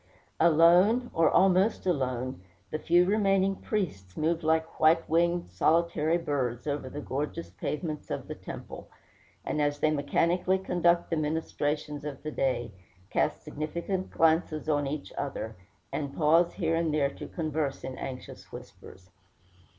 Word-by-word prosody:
Alone, 175 +9 +5
or 165 -2 +4
almost 190 +3 +3
alone, 130 - -1 0.3
the 155 - -2
few 175 +2 +4
remaining 195 -1 +2
priests 145 - -4
move 165 +2 0
like 160 +1 0
white 165 +1 +4
winged, 170 +2 +1
solitary 165 - +2
birds 130 -7 -2
over 145 -3 -3
the 145 - -6
gorgeous 150 +4 -4
pavements 155 -1 -4
of - - -4
the - - -4
temple, - - -9 0.6
and 150 - -1
as 145 0 +1
they 155 +1 +2
mechanically 170 +6 +1
conduct 175 -2 +1
the - - +2
ministrations 150 -1 -2
of 145 -3 -6
the 155 - -4
day, 130 -5 -1 0.4
cast - - 0
significant 170 +5 -3
glances 160 -1 +1
on 145 -2 +1
each 145 +1 -5
other, 115 -5 -4 0.4
and 140 -2 -3
pause 165 +2 +4
here 165 -4 -1
and 165 -1 +1
there 145 -2 +1
to - - -8
converse 155 -4 -3
in 130 - -5
anxious 130 -1 -8
whispers. 90 0 -12
155 Hz, 145 wpm, -28 LUFS, 145-170 Hz, 0.6 s, Alone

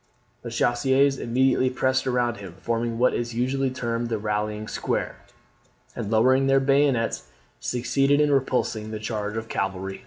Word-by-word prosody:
The 120 - -6
chasseurs 130 +4 +2
immediately 130 +2 +2
pressed 130 +1 0
around 120 -2 0
him, 95 -4 -10
forming 115 +1 -2
what 125 +2 +3
is 120 -1 -3
usually 130 +3 0
termed 120 -2 -3
the 115 - -1
rallying 105 0 -2
square, - - -2 0.8
and, 100 - -4
lowering 130 +5 +3
their 135 0 +4
bayonets, 135 -3 +1 0.3
succeeded 135 +3 +1
in 150 -1 +3
repulsing 125 -5 0
the 110 - -4
charge 105 -1 -3
of 115 0 -4
cavalry. 95 -2 -3
120 Hz, 150 wpm, -25 LUFS, 110-130 Hz, 0.8 s, their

